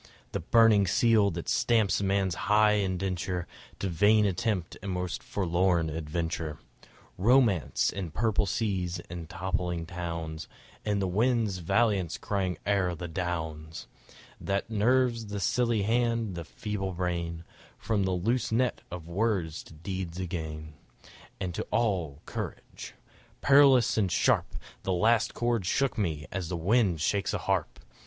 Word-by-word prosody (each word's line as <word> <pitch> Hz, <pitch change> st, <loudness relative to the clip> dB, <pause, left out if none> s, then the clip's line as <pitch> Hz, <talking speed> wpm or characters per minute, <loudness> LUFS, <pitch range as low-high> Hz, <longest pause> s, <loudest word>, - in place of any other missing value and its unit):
The -, -, -2 dB
burning 110 Hz, -4 st, +5 dB
seal 110 Hz, +1 st, +4 dB
that 85 Hz, -2 st, -5 dB
stamps 110 Hz, -5 st, +2 dB
man's 95 Hz, -1 st, +1 dB, 0.2 s
high 105 Hz, 0 st, +5 dB
indenture 90 Hz, -2 st, -2 dB, 0.3 s
To 100 Hz, -, -2 dB
vain 105 Hz, +5 st, +4 dB
attempt 95 Hz, -2 st, -1 dB
and 100 Hz, 0 st, -4 dB
most 90 Hz, -1 st, -3 dB
forlorn 85 Hz, -3 st, +1 dB
adventure; 80 Hz, 0 st, -3 dB, 0.6 s
Romance, 115 Hz, -, +3 dB
and 95 Hz, -5 st, -4 dB
purple 110 Hz, +2 st, +1 dB
seas, 95 Hz, -5 st, -1 dB
and 85 Hz, -2 st, -7 dB
toppling 90 Hz, -1 st, -2 dB
towns, 85 Hz, -2 st, -5 dB, 0.4 s
And 105 Hz, -1 st, 0 dB
the -, -, 0 dB
wind's 110 Hz, 0 st, +1 dB
valiance 95 Hz, -1 st, +1 dB
crying 95 Hz, -3 st, -2 dB
o'er 95 Hz, -3 st, +1 dB
the 85 Hz, +2 st, -6 dB
downs; 80 Hz, -2 st, -4 dB, 0.5 s
That 100 Hz, +3 st, -2 dB
nerves 115 Hz, +1 st, +2 dB
the 100 Hz, 0 st, -4 dB
silly 115 Hz, +2 st, +1 dB
hand, 115 Hz, -1 st, +1 dB
the 85 Hz, -2 st, -6 dB
feeble 95 Hz, 0 st, -4 dB
brain, 85 Hz, -2 st, -3 dB, 0.3 s
From 105 Hz, -2 st, -1 dB
the 95 Hz, -, 0 dB
loose 110 Hz, +8 st, 0 dB
net 125 Hz, +1 st, +1 dB
of 85 Hz, -2 st, -7 dB
words 90 Hz, -4 st, -1 dB
to -, -, -14 dB
deeds 90 Hz, +1 st, -5 dB
again 80 Hz, -4 st, -5 dB, 0.7 s
And 95 Hz, -3 st, -3 dB
to -, -, -3 dB
all 90 Hz, -11 st, -1 dB
courage! -, -, -7 dB, 0.5 s
Perilous 135 Hz, -5 st, +5 dB
and 95 Hz, -4 st, +1 dB
sharp -, -, +2 dB, 0.3 s
The 95 Hz, -, -1 dB
last 110 Hz, +4 st, +2 dB
chord 120 Hz, -6 st, 0 dB
shook 135 Hz, +6 st, +1 dB
me 80 Hz, -8 st, -2 dB
as 95 Hz, -2 st, -4 dB
wind 90 Hz, 0 st, +2 dB
shakes 100 Hz, +5 st, 0 dB
a -, -, +1 dB
harp! -, -, -1 dB
95 Hz, 135 wpm, -29 LUFS, 85-110 Hz, 0.7 s, burning